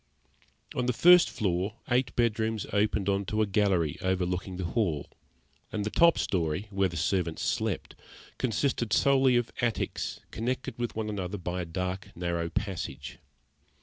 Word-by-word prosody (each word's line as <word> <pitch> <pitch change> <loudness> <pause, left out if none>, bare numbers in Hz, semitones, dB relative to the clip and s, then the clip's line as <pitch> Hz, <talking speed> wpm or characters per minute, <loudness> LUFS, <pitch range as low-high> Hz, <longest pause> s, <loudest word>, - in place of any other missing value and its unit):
On 125 -1 -1
the 125 - +2
first 180 0 +7
floor 95 +1 -1
eight 125 0 +1
bedrooms 110 -2 +1
opened 105 -1 +1
on 100 0 +1
to 110 +3 +1
a - - +2
gallery 95 -6 +1
overlooking 90 0 -1
the 95 - -3
hall, 85 -7 -1 0.6
and 105 -1 -2
the 105 - -2
top 170 0 +5
storey, 85 +1 -1
where 95 -1 +1
the 85 - -6
servants 85 0 0
slept, - - -1 0.5
consisted 120 -2 0
solely 135 -2 +4
of 120 -1 +1
attics 120 -2 -1
connected 130 +2 -3
with 120 -1 -2
one 110 -1 -2
another 100 -2 -3
by 90 0 -3
dark, 90 +2 -3
narrow 85 -1 -2
passages. 80 -9 -4
100 Hz, 150 wpm, -29 LUFS, 90-115 Hz, 0.6 s, first